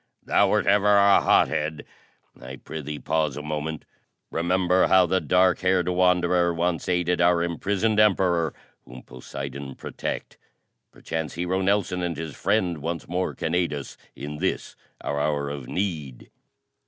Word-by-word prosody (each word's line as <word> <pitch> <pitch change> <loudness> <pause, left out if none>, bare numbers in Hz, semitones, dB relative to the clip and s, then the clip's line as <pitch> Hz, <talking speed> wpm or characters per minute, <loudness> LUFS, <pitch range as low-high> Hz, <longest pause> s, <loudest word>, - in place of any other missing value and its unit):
"Thou 100 - +3
wert 105 +1 +2
ever 100 +1 +4
a 100 0 +5
hothead! 75 0 +1 0.6
I 65 +2 -8
prithee 75 0 -7
pause 75 -2 -1
a 75 - -6
moment! 75 0 -4 0.5
Remember 90 +2 +2
how 95 -1 +5
the 95 +2 +1
dark 90 0 +3
haired 90 -1 +1
Wanderer 90 -1 +2
once 85 0 -1
aided 90 0 +1
our 85 -1 +4
imprisoned 100 +5 0
Emperor, 90 -6 +2 0.3
whom 65 +1 -12
Poseidon 70 +2 -8
protect! - - -6 0.5
Perchance, 80 -1 -5
Hero 90 +2 -1
Nelson 95 -2 0
and 85 -3 -2
his 80 -2 -6
friend 95 -4 0
once 80 +2 -4
more 90 +2 -2
can 80 - -3
aid 90 -1 +1
us 70 -2 -6 0.2
in 75 +2 -7
this, 95 - -2 0.3
our 70 - -2
hour 70 -1 -1
of 70 -3 -6
need." 80 -10 -4
85 Hz, 145 wpm, -25 LUFS, 75-95 Hz, 0.6 s, a